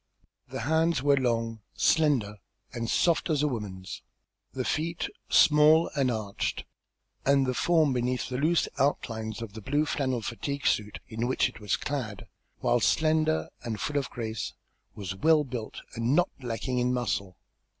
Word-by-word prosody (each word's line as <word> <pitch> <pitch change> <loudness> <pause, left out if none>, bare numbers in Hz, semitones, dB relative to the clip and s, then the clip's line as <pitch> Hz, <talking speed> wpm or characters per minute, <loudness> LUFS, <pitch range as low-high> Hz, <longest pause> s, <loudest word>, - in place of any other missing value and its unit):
The - - -5
hands 160 0 +2
were 140 -1 +5
long, 115 -3 0 0.2
slender, 135 -11 +2 0.4
and 115 -1 -3
soft 170 0 +2
as 150 -2 +2
a - - +3
woman's; 95 - -5 0.5
the - - -3
feet 165 +2 -1 0.2
small 155 +2 +6
and 135 -3 +2
arched, 110 -4 -3 0.6
and 140 -1 +4
the 130 - 0
form 155 0 +3
beneath 125 0 -1
the 125 0 -3
loose 160 +4 +2
outlines 110 -5 -1
of 105 -3 -8
the 110 - -8
blue 145 +7 +1
flannel 130 -6 -1
fatigue 140 +5 -4
suit 105 0 +1
in 115 +2 -2
which 130 - +2
it 125 - -13
was 105 -2 0
clad, 120 -7 -4 0.4
while 120 - +3
slender 155 - +2
and 110 -3 -4
full 145 -1 0
of 135 - -4
grace, 110 -2 -4 0.4
was 100 -4 -5
well 155 +8 +4
built 125 -5 -6
and 115 +4 +1
not 175 +2 +3
lacking 125 +1 -2
in 125 0 +1
muscle. 100 -6 -2
125 Hz, 160 wpm, -28 LUFS, 110-150 Hz, 0.6 s, small